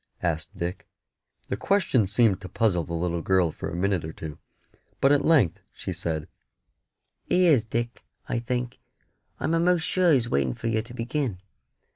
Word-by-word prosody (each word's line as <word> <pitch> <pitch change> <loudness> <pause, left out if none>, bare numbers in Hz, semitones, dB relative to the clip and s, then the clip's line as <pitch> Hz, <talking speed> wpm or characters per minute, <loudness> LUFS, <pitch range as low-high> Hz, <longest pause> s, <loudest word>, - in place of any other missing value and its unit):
asked 80 -3 -2
Dick. 85 +2 -4 0.6
The - - -1
question 170 - +2
seemed 105 -1 +3
to 95 - -8
puzzle 95 -5 +1
the 85 +2 -5
little 85 0 -1
girl 90 -2 +2
for - - -5
a - - -5
minute 95 -1 0
or 80 - -5
two; 80 -2 -8 0.6
but 135 - +4
at 145 -1 +4
length 140 - +4
she - - -5
said 80 -2 -3 1.0
"He 180 0 +3
is, 140 -10 +5
Dick, 120 +1 -3 0.2
I 120 - -1
think; 125 0 -3 0.6
I'm 160 - 0
a'most 170 0 +3
sure 180 -2 +3
He's 125 -6 +3
waiting 70 - 0
for - - -9
yer 110 -1 +1
to 120 +2 -12
begin." 125 -2 -2
110 Hz, 170 wpm, -26 LUFS, 85-135 Hz, 1.0 s, is